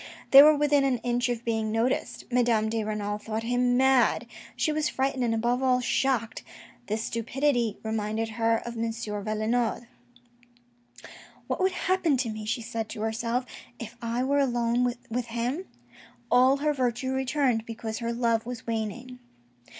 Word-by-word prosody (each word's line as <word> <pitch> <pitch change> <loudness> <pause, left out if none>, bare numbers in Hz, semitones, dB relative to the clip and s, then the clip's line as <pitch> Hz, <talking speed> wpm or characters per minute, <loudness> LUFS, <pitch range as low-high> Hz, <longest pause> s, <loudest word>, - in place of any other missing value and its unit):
They 275 - +11
were 305 +1 +7
within 290 -1 +3
an 265 -2 +2
inch 245 0 0
of 240 -1 -3
being 220 -2 -1
noticed. 230 +4 -1
Madame 235 -3 +2
de 225 0 -1
Renal 210 -1 -3
thought 220 +1 -4
him 245 +1 +1
mad. 265 -1 +3 0.3
She 310 - 0
was 305 0 0
frightened, 265 -1 -1
and 230 -2 +1
above 240 +3 0
all, 255 -1 +3
shocked. 245 -2 0 0.5
This 220 +1 -2
stupidity 240 -1 0
reminded 220 0 -2
her 225 0 0
of 235 - -6
M. 230 0 -1
Valenod. 220 +2 -2 0.8
" 240 0 -19
What - - -3
would 375 0 +2
happen 360 -6 +1
to 245 -2 -1
me," 215 -1 -6
she 235 +1 -2
said 225 -1 -4
to 210 - -6
herself, 230 +3 -1 0.2
" 240 - -28
if 230 0 -8
I 235 +2 -1
were 280 +2 +2
alone 245 -2 +1 0.2
with 245 +1 -1
him? 240 +10 -2 0.3
" 240 -1 -24
All 255 +3 +5
her 300 +1 0
virtue 255 -1 -1
returned, 265 -3 0
because 225 -1 -5
her 235 -1 -2
love 230 -1 +1
was 245 -2 -6
waning. 230 +3 -4
240 Hz, 165 wpm, -27 LUFS, 225-255 Hz, 0.8 s, They